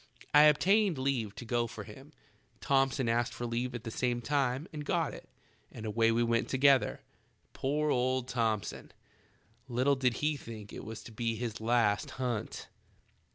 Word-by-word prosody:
I 150 +1 +8
obtained 190 +4 +4
leave 130 -6 -1
to 120 - -8
go 120 0 0
for - - -8
him; - - -13 0.5
Thomson 135 -2 +1
asked 120 +1 0
for 120 - -4
leave 120 +1 -2
at 120 - -6
the 115 - -5
same 120 +1 0
time 135 +2 0
and 150 -1 -5
go - - +1
it, - - -7 0.4
and 110 - -8
away 115 +1 +2
we 115 +1 +2
went 115 +1 +1
together. 135 0 +3 0.5
Poor 150 +2 0
old 130 0 +1
Thomson! 115 -5 -2 0.8
Little 130 +3 +2
did 130 -3 +1
he 150 0 0
think 110 -5 -9
it - - -7
was 110 0 -8
to - - -11
be 115 +1 -2
his 110 -1 -4
last 115 -3 +2
hunt. 120 -4 -3
120 Hz, 165 wpm, -31 LUFS, 115-135 Hz, 0.8 s, I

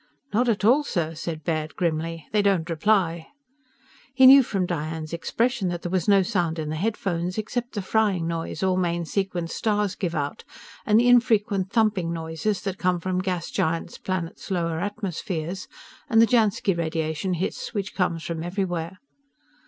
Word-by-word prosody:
_" - - -23
"Not 240 +3 +2
at 210 -2 +1
all, 265 +7 +5
sir," 165 - -2
said 160 -1 -5
Baird 155 -2 -2
grimly. 165 -2 -2
"They 210 - +3
don't 185 -4 +1
reply." 170 -2 +1 0.9
He 260 0 +7
knew 270 +1 +10
from 195 -7 -1
Diane's 160 -1 -4
expression 225 +6 0
that 175 -1 -4
there 175 - -3
was 185 -1 0
no 200 -2 +5
sound 175 -5 -1
in 155 -1 -3
the 155 - -2
headphones 180 -2 -2
except 240 +3 -3
the 205 - -2
frying 195 -4 +1
noise 165 +1 -3
all 185 -1 +2
main 175 -2 0
sequence 180 -2 -2
stars 210 -3 0
give 170 -3 -3
out, 145 -2 -3 0.4
and 215 0 +5
the 245 - +3
infrequent 220 -5 +3
thumping 205 -6 +1
noises 165 +5 -2
that 195 -1 -4
come 180 -1 +1
from 185 +1 -1
gas 180 -2 -2
giant 165 +1 -1
planets' 185 -3 -4
lower 170 -3 -1
atmospheres, 185 -3 -4 0.4
and 225 - +4
the 230 - +8
Jansky 215 -4 +2
radiation 160 +2 -2
hiss 180 +3 -3
which 200 -1 -3
comes 170 -4 -1
from 165 0 -4
everywhere. 175 -1 -3
185 Hz, 170 wpm, -25 LUFS, 165-205 Hz, 0.9 s, knew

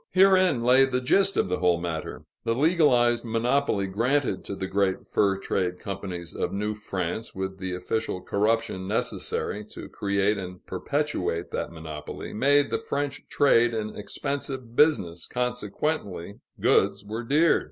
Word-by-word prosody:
Herein 185 -8 +5
lay 130 +2 +6
the 130 -1 -1
gist 195 +10 +2
of - - +2
the 90 0 -1
whole 90 -1 +3
matter: 85 -2 -4 0.2
The 115 - 0
legalized 125 -6 +3
monopoly 115 -1 +1
granted 115 +3 0
to 100 - -4
the 95 - -4
great 95 0 0
fur 100 -1 +2
trade 90 -2 -2
companies 95 -3 -5
of - - -1
New 105 +2 -1
France, 100 0 -4
with 95 0 -4
the 95 -1 -3
official 95 +2 -2
corruption 100 -1 0
necessary 105 -1 -2
to - - -8
create 100 +1 0
and 90 -1 -8
perpetuate 95 - -2
that - - -3
monopoly, 80 -2 -7
made 140 +5 +3
the - - 0
French 145 -10 -3
trade 120 -4 +4
an 110 -1 -3
expensive 130 +2 -4
business, 90 - +2
consequently 110 - -3 0.2
goods - - +2
were 110 +3 -4
dear. 150 +7 +4
105 Hz, 145 wpm, -26 LUFS, 95-135 Hz, 0.2 s, lay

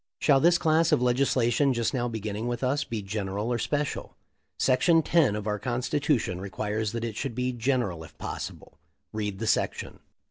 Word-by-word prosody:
"Shall 140 -3 +4
this 170 +4 +5
class 160 0 +3
of - - +4
legislation 125 +1 +2
just 115 -2 0
now 120 -2 0
beginning 110 -1 -4
with 120 +1 -3
us 140 +3 +1
be 115 -6 -5
general 100 +3 -2
or 120 - -1
special? 145 +4 -2 0.4
"Section 160 +6 +4
Ten 145 -9 +3
of 105 -1 -4
our 105 -1 -1
Constitution 125 - 0
requires 105 +2 -2
that 115 0 -2
it 115 -3 -4
should 130 0 -3
be 125 +1 0
general, 120 -9 -1
if 80 - -15
possible. - - -7 0.3
(Read 105 -2 -3
the 115 - -3
Section.) - - -1
120 Hz, 175 wpm, -27 LUFS, 105-135 Hz, 0.4 s, this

